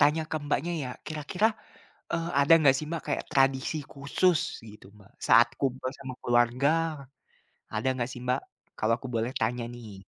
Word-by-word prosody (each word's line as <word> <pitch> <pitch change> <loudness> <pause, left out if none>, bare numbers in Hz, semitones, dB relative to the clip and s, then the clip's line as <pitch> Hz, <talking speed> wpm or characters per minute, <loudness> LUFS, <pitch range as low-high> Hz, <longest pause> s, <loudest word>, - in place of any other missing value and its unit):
tanya 150 +3 +4
ke - - -1
Mbaknya 150 +3 -1
ya, 125 - -4 0.2
kira-kira, 155 +8 0 0.6
eee, 165 0 -1
ada 140 +3 +5
enggak 140 -4 +5
sih, 155 - -5
Mbak, 170 - -3
kayak - - 0
tradisi 135 +3 +2
khusus 155 +4 +2 0.3
gitu, 105 - -15
Mbak, 100 -1 -19
saat 120 +1 +6
kumpul 130 -1 -1
sama 130 -2 -7
keluarga, 120 +3 +3 1.1
ada 110 +5 0
enggak 125 -2 -2
sih 125 - -8
Mbak? 125 0 0 0.4
Kalau 110 +1 +2
aku 130 - -7
boleh 115 +3 0
tanya 120 +1 -1
nih. 105 -5 -11
130 Hz, 165 wpm, -28 LUFS, 120-150 Hz, 1.1 s, saat